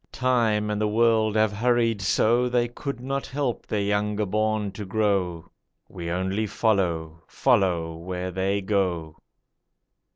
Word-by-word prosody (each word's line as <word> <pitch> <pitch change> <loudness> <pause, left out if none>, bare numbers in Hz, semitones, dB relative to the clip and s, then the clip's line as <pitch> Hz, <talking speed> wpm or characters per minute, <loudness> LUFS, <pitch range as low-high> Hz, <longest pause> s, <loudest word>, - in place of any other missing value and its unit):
Time 115 -5 +1
and 105 0 -2
the 105 - +2
World 110 0 +2
have 110 -1 +3
hurried 115 0 +1
so 120 +5 +2
They 120 -1 +1
could 130 +2 -6
not 135 +2 -3
help 135 -3 -3
their 105 - -1
younger 105 +1 0
born 110 0 0
to 105 +2 -7
grow; 95 -5 -1 0.4
We 85 -1 -6
only 95 +5 -1
follow, 85 -7 0
follow 90 -10 +1
where 90 +2 -5
they 95 +2 0
go. 90 -6 -1
105 Hz, 135 wpm, -25 LUFS, 95-115 Hz, 0.4 s, have